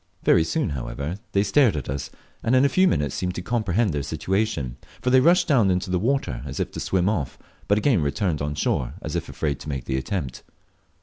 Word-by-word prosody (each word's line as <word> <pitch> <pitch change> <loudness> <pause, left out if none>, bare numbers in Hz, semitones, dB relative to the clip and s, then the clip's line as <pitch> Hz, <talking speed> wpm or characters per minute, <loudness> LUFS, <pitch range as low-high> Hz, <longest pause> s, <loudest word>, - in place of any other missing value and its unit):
Very 80 - +5
soon, 80 -2 -1
however, 70 +7 -4
they 100 - +3
stared 105 - +4
at 70 - -5
us, 70 +1 -4 0.3
and 120 - +2
in 130 +2 +5
a - - +4
few 185 +7 +4
minutes 75 - 0
seemed 90 -1 -2
to 90 - -4
comprehend 110 -3 0
their 75 - -1
situation; 95 - -2 0.2
for 125 - 0
they 130 - +7
rushed 175 +5 +4
down 120 -10 +4
into 90 0 0
the 90 - +2
water, 115 - 0
as 70 -1 -6
if - - -2
to - - -6
swim 95 -1 +1
off, 90 -11 -1 0.3
but 100 - +3
again 110 - +3
returned 75 +2 -1
on 75 0 -2
shore, - - -1
as - - -4
if - - -3
afraid 75 -4 -2
to - - -8
make 70 -4 -4
the 65 - -1
attempt. 65 -2 -3
90 Hz, 225 wpm, -24 LUFS, 70-110 Hz, 0.3 s, they